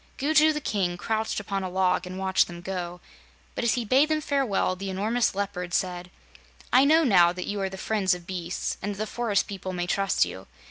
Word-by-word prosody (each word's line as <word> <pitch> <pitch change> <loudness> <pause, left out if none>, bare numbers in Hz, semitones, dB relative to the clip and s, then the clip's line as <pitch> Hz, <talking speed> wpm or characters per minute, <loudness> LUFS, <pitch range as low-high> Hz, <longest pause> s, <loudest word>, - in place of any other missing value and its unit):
Gugu 310 +2 +4
the 300 - -2
King 185 -8 -1
crouched 220 +3 -2
upon 195 -1 -3
a 185 - -3
log 185 0 +1
and 185 +1 -7
watched 190 0 +2
them 175 -1 -9
go, 180 -1 -5 0.5
but - - -3
as 235 - +2
he 240 -2 -2
bade 270 +7 +4
them 310 0 +1
farewell, 270 -11 0
the 195 +1 -5
enormous 215 +4 0
Leopard 180 -3 -3
said: 180 -1 -2 0.6
"I 260 +2 +7
know 320 +3 +5
now 180 - +5
that 180 0 -5
you 205 -1 -3
are 190 - -1
the 190 - -8
friends 195 -3 +1
of 175 -1 -11
beasts 180 -1 -4
and 205 0 -3
that - - -13
the 215 - -2
forest 220 -2 0
people 190 -2 -6
may 175 -1 -2
trust 195 - +1
you. 90 +2 -9
195 Hz, 220 wpm, -26 LUFS, 180-225 Hz, 0.6 s, I